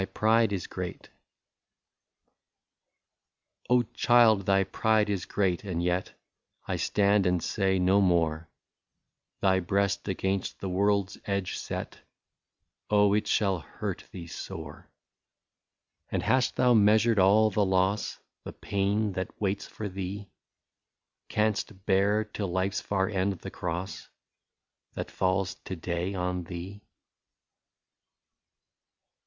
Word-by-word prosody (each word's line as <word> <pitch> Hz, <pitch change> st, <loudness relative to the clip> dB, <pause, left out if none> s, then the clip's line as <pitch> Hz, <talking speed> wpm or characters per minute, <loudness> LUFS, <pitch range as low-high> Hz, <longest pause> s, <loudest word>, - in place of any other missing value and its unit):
I30 -, -, 0 dB
THY -, -, 0 dB
PRIDE 110 Hz, -1 st, +3 dB
IS 95 Hz, -3 st, -3 dB
GREAT. -, -, -6 dB
'^ -, -, -19 dB, 2.6 s
Oh! 125 Hz, 0 st, +4 dB
child, 115 Hz, -5 st, +4 dB
thy 95 Hz, 0 st, +4 dB
pride 110 Hz, +2 st, +1 dB
is 95 Hz, -4 st, -2 dB
great, 95 Hz, -3 st, 0 dB
and 90 Hz, -4 st, -3 dB
yet 90 Hz, +1 st, -2 dB, 0.5 s
I -, -, -1 dB
stand 100 Hz, -1 st, +2 dB
and 90 Hz, 0 st, +2 dB
say 95 Hz, -2 st, +1 dB
no 95 Hz, +2 st, +3 dB
more 85 Hz, -3 st, +1 dB, 0.5 s
—. -, -, -56 dB
Thy 95 Hz, -1 st, +4 dB
breast 100 Hz, +2 st, 0 dB
against 95 Hz, 0 st, -2 dB
the 95 Hz, -, -4 dB
world's 100 Hz, +1 st, +1 dB
edge 100 Hz, -2 st, -2 dB
set -, -, -5 dB, 0.9 s
Oh! 105 Hz, -1 st, +4 dB
it 105 Hz, 0 st, +1 dB
shall 95 Hz, -4 st, +1 dB
hurt 80 Hz, -, -6 dB
thee 85 Hz, -2 st, -8 dB
sore. 80 Hz, -, -8 dB, 1.2 s
And -, -, -2 dB
hast 130 Hz, -1 st, +2 dB
thou 125 Hz, -1 st, +4 dB
measured 110 Hz, +1 st, +4 dB
all 105 Hz, +3 st, +5 dB
the 105 Hz, +1 st, +2 dB
loss, 95 Hz, +2 st, +1 dB
— -, -, -60 dB
The -, -, -7 dB
pain, 100 Hz, +2 st, -1 dB
that 95 Hz, 0 st, -5 dB
waits 100 Hz, -1 st, -1 dB
for 105 Hz, -, -6 dB
thee, 95 Hz, +1 st, -6 dB, 1.0 s
Canst 105 Hz, -2 st, -1 dB
bear, 100 Hz, +2 st, +3 dB
till 105 Hz, -1 st, -5 dB
life's 95 Hz, +2 st, -1 dB
far 95 Hz, -1 st, 0 dB
end, 100 Hz, -1 st, 0 dB
the 90 Hz, -, -9 dB
cross. 90 Hz, +2 st, -5 dB, 0.9 s
That -, -, -5 dB
falls 95 Hz, 0 st, 0 dB
to 95 Hz, -, -4 dB
day 85 Hz, +3 st, -3 dB
on 90 Hz, -1 st, -2 dB
thee 90 Hz, +4 st, -7 dB
100 Hz, 125 wpm, -28 LUFS, 95-105 Hz, 2.6 s, all